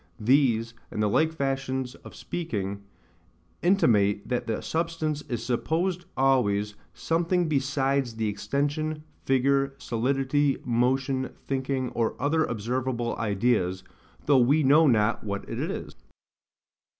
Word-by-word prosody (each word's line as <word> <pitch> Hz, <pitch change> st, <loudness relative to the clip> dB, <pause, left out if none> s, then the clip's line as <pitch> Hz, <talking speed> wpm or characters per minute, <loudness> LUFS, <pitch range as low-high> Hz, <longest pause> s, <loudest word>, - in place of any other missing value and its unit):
These, 120 Hz, -1 st, +2 dB, 0.2 s
and 105 Hz, -, -2 dB
the -, -, +3 dB
like 160 Hz, +10 st, +2 dB
fashions 135 Hz, -3 st, -2 dB
of -, -, -13 dB
speaking, 100 Hz, -, -4 dB, 0.8 s
intimate 105 Hz, -, +3 dB
that 125 Hz, -1 st, -2 dB
the 110 Hz, -2 st, -2 dB
substance 160 Hz, -2 st, -2 dB
is 120 Hz, -1 st, -3 dB
supposed 170 Hz, +9 st, -1 dB
always 105 Hz, -6 st, +2 dB, 0.2 s
SOMETHING 170 Hz, +1 st, 0 dB
BESIDES 135 Hz, -3 st, 0 dB
the 110 Hz, -1 st, -1 dB
extension, 145 Hz, +8 st, -2 dB, 0.2 s
figure, 135 Hz, +1 st, +2 dB
solidity, 135 Hz, +4 st, 0 dB
motion, 130 Hz, +2 st, 0 dB
thinking, 130 Hz, -1 st, -1 dB
or 115 Hz, -1 st, -1 dB
other 155 Hz, +4 st, +2 dB
observable 120 Hz, +1 st, -2 dB
ideas, 100 Hz, -4 st, 0 dB, 0.4 s
though 140 Hz, -2 st, +5 dB
we 140 Hz, +6 st, +4 dB
know 150 Hz, +4 st, +6 dB
not 115 Hz, -3 st, +2 dB
what 100 Hz, -2 st, -4 dB
it -, -, -5 dB
is. -, -, -4 dB
130 Hz, 115 wpm, -26 LUFS, 115-145 Hz, 0.8 s, know